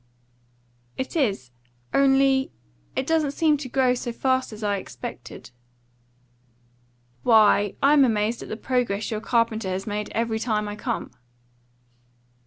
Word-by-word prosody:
"It 260 - -4
is. 200 - 0 0.4
Only 270 -1 +3 0.4
it 260 - -1
doesn't 310 -2 +1
seem 310 0 +3
to 275 -2 -7
grow 255 0 +2
so 245 -1 -4
fast 260 +1 0
as 215 0 -9
I 205 -1 0
expected." 185 - -9 1.7
"Why, 210 -3 +4
I'm 285 0 +6
amazed 220 -1 0
at - - -9
the 215 - -4
progress 235 -5 -1
your 215 -1 -3
carpenter 230 -4 0
has 185 +1 -3
made 210 0 -3
every 225 -1 0
time 215 -2 -1
I 205 - -5
come." 230 +2 -4
230 Hz, 130 wpm, -24 LUFS, 210-265 Hz, 1.7 s, I'm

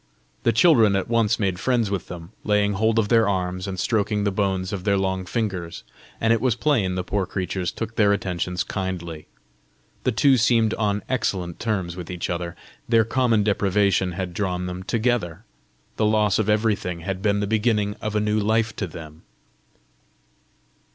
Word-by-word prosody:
The 115 - +3
children 115 - +5
at 95 - -1
once 115 -2 +2
made 95 -4 0
friends 115 -3 +1
with 95 -2 -3
them, 85 0 -9
laying 105 -1 +2
hold 110 +3 +1
of 105 -3 +2
their 115 -3 +4
arms, 90 -1 -2
and 95 -2 -4
stroking 105 -1 0
the 100 - +1
bones 95 -1 -1
of 95 -3 -4
their 100 0 +2
long 95 -1 -1
fingers; 95 -6 -3 0.4
and 115 0 +3
it 115 - 0
was 125 -4 +2
plain 115 -9 +1
the 90 - -2
poor 95 0 -1
creatures 95 -1 -3
took 115 0 -6
their 105 -2 +4
attentions 90 -2 -1
kindly. 85 -5 -5 0.8
The 130 - +2
two 135 +3 +4
seemed 115 -2 +3
on 105 -2 -1
excellent 95 -9 -2
terms 95 -7 -2
with 90 -2 -8
each 90 -1 -3
other. 85 0 -4 0.3
Their 115 -2 +4
common 115 -2 +2
deprivation 100 -2 +1
had 90 0 -4
drawn 90 -1 -2
them 90 0 -5
together! 110 -4 -1 0.5
the 110 - +2
loss 105 -2 +2
of 110 -1 0
everything 105 -5 0
had 95 +2 -4
been 100 0 +1
the 100 - 0
beginning 105 -1 +1
of 110 0 -3
a - - +3
new 105 0 +1
life 110 +1 +1
to 100 - -2
them! 80 -1 -11
100 Hz, 180 wpm, -23 LUFS, 90-110 Hz, 0.8 s, children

